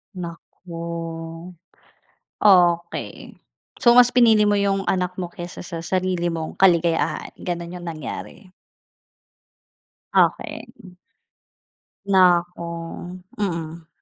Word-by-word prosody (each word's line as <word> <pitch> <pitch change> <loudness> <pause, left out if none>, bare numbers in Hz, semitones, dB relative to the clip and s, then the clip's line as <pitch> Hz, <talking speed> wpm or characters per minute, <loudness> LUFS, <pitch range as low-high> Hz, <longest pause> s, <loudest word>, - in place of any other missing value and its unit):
Nako. 170 -1 -7 0.9
Okey. 175 -4 +2 0.4
So 240 - +5
mas 245 0 +7
pinili 225 -4 +4
mo 205 - +3
'yong 195 -1 0
anak 180 -1 0
mo 175 - -3
kaysa 175 0 -9
sa 165 -2 -7
sarili 180 -1 -1
mong 160 -1 -5
kaligayahan. 170 -3 +2
Gano'n 175 0 -5
'yong 175 - -9
nangyari? 165 +4 -7 1.7
Okey. 185 -6 -1 1.1
Naku, 180 -3 +3 0.7
mm. 165 -4 -4
175 Hz, 85 wpm, -22 LUFS, 170-190 Hz, 1.7 s, mas